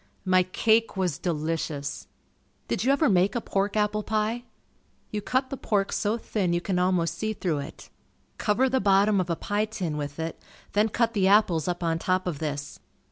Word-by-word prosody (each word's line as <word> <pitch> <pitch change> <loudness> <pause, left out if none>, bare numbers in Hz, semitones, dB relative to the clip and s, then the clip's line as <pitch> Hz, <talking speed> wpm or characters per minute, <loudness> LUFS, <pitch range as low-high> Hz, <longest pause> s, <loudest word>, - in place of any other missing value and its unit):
My 185 0 +5
cake 220 +4 +2
was 180 -6 0
delicious. 155 -3 -3 0.6
Did - - -1
you 260 - +3
ever 290 +2 +3
make 190 -1 +3
a - - +2
pork 200 -1 -1
apple 210 0 +1
pie? 220 +3 -1 0.7
You 210 - -2
cut 260 +5 -1
the 275 - -3
pork 200 -5 0
so 215 +2 0
thin 195 -6 -1
you 175 - +2
can 180 0 -1
almost 180 -2 +1
see 220 0 -1
through 170 -8 -1
it. 140 - -9 0.5
Cover 230 +5 +2
the 260 0 +1
bottom 200 0 +4
of 180 - -5
a 170 - +1
pie 205 +5 -1
tin 185 -8 -4
with 145 +1 -5
it, 165 0 -4 0.3
then 210 +2 +3
cut 230 +1 +1
the 195 -4 +2
apples 190 -6 +4
up 175 0 -2
on 165 -1 0
top 185 +2 0
of 170 -6 -3
this. 145 -2 -4
195 Hz, 190 wpm, -26 LUFS, 170-215 Hz, 0.7 s, My